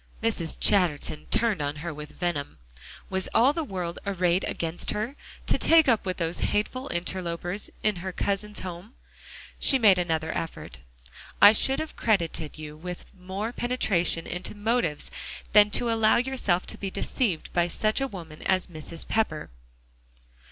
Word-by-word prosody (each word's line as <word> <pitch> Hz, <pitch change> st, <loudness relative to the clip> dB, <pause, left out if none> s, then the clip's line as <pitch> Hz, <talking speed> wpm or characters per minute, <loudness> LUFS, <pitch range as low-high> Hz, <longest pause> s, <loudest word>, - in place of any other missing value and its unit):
Mrs. 190 Hz, -8 st, 0 dB
Chatterton 170 Hz, -6 st, +2 dB
turned 220 Hz, -9 st, +1 dB
on 145 Hz, 0 st, -2 dB
her 160 Hz, +2 st, -5 dB
with 150 Hz, 0 st, -9 dB
venom. 150 Hz, -, -3 dB, 0.5 s
Was 190 Hz, 0 st, -1 dB
all 250 Hz, +5 st, +5 dB
the 330 Hz, -, -2 dB
world 180 Hz, -, -4 dB
arrayed 180 Hz, -2 st, +1 dB
against 165 Hz, +1 st, -3 dB
her, 220 Hz, +6 st, -2 dB, 0.3 s
to -, -, +2 dB
take 325 Hz, -2 st, +5 dB
up 230 Hz, -6 st, +2 dB
with 185 Hz, -, -2 dB
those 165 Hz, -1 st, 0 dB
hateful 255 Hz, +6 st, -1 dB
interlopers 175 Hz, +2 st, -3 dB
in 215 Hz, -3 st, +1 dB
her 185 Hz, +2 st, -4 dB
cousin's 200 Hz, +3 st, -2 dB
home? 185 Hz, +5 st, -8 dB, 0.6 s
She 270 Hz, -, +5 dB
made 205 Hz, -7 st, +5 dB
another 160 Hz, -2 st, -1 dB
effort. 165 Hz, -, -5 dB, 0.6 s
"I 205 Hz, +1 st, +9 dB
should 265 Hz, +4 st, +3 dB
have 315 Hz, -, -5 dB
credited 170 Hz, -8 st, 0 dB
you 150 Hz, -1 st, -8 dB
with 180 Hz, +3 st, -8 dB
more 195 Hz, +5 st, -5 dB
penetration 195 Hz, -10 st, +1 dB
into 180 Hz, +4 st, -3 dB
motives 205 Hz, -7 st, -1 dB, 0.4 s
than 210 Hz, 0 st, +7 dB
to 235 Hz, +3 st, +1 dB
allow 220 Hz, -1 st, +4 dB
yourself 240 Hz, -8 st, 0 dB
to -, -, -6 dB
be 195 Hz, -, -3 dB
deceived 195 Hz, -2 st, -1 dB
by 175 Hz, 0 st, +2 dB
such 215 Hz, +8 st, 0 dB
a 270 Hz, -, +1 dB
woman 165 Hz, -9 st, -10 dB
as 185 Hz, -1 st, +1 dB
Mrs. 160 Hz, 0 st, -2 dB
Pepper." 170 Hz, -, -1 dB
185 Hz, 155 wpm, -27 LUFS, 170-220 Hz, 0.6 s, I